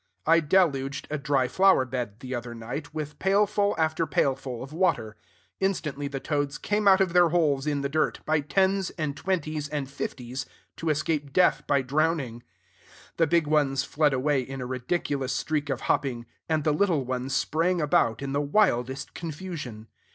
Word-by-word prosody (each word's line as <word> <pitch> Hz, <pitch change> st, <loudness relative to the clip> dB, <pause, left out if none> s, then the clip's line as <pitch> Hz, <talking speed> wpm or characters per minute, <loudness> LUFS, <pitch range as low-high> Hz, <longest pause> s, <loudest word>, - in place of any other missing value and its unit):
I 165 Hz, +1 st, +5 dB
deluged 145 Hz, -5 st, +1 dB
a 150 Hz, -, -1 dB
dry 140 Hz, -2 st, +1 dB
flower 190 Hz, -4 st, +4 dB
bed, 120 Hz, -3 st, -5 dB
the 130 Hz, 0 st, -6 dB
other 120 Hz, -1 st, -5 dB
night, 125 Hz, +8 st, -6 dB
with 150 Hz, -1 st, -6 dB
pailful 205 Hz, +1 st, +2 dB
after 160 Hz, 0 st, +1 dB
pailful 135 Hz, -4 st, -1 dB
of 135 Hz, +3 st, -10 dB
water. 160 Hz, -, 0 dB, 0.4 s
Instantly 155 Hz, -7 st, -1 dB
the 140 Hz, -1 st, -4 dB
toads 145 Hz, 0 st, -2 dB
came 210 Hz, 0 st, 0 dB
out 190 Hz, 0 st, +7 dB
of 185 Hz, -3 st, +1 dB
their 175 Hz, -1 st, +6 dB
holes 150 Hz, -4 st, +1 dB
in 145 Hz, -2 st, 0 dB
the 140 Hz, -, 0 dB
dirt, 155 Hz, +3 st, 0 dB
by 155 Hz, 0 st, +2 dB
tens 190 Hz, +5 st, +1 dB
and 150 Hz, -3 st, -2 dB
twenties 155 Hz, -5 st, -2 dB
and 145 Hz, -2 st, -3 dB
fifties, 130 Hz, -1 st, -5 dB, 0.3 s
to 165 Hz, -, -2 dB
escape 150 Hz, -1 st, -1 dB
death 180 Hz, +3 st, +3 dB
by 140 Hz, -2 st, +2 dB
drowning. 140 Hz, -3 st, 0 dB, 0.8 s
The 165 Hz, -, +3 dB
big 170 Hz, +1 st, +3 dB
ones 145 Hz, -3 st, +2 dB
fled 150 Hz, 0 st, +1 dB
away 135 Hz, +1 st, +1 dB
in 135 Hz, +1 st, -7 dB
a 125 Hz, -, -4 dB
ridiculous 130 Hz, +1 st, -2 dB
streak 150 Hz, -2 st, -1 dB
of 135 Hz, -2 st, -2 dB
hopping; 120 Hz, -4 st, -1 dB, 0.2 s
and 155 Hz, -2 st, +1 dB
the 150 Hz, -, +2 dB
little 165 Hz, -5 st, +1 dB
ones 130 Hz, +2 st, -2 dB
sprang 170 Hz, +5 st, +1 dB
about 140 Hz, -6 st, +2 dB
in 135 Hz, 0 st, -3 dB
the 145 Hz, -, +1 dB
wildest 135 Hz, -, +1 dB
confusion. 155 Hz, -10 st, -6 dB
145 Hz, 175 wpm, -26 LUFS, 135-165 Hz, 0.8 s, out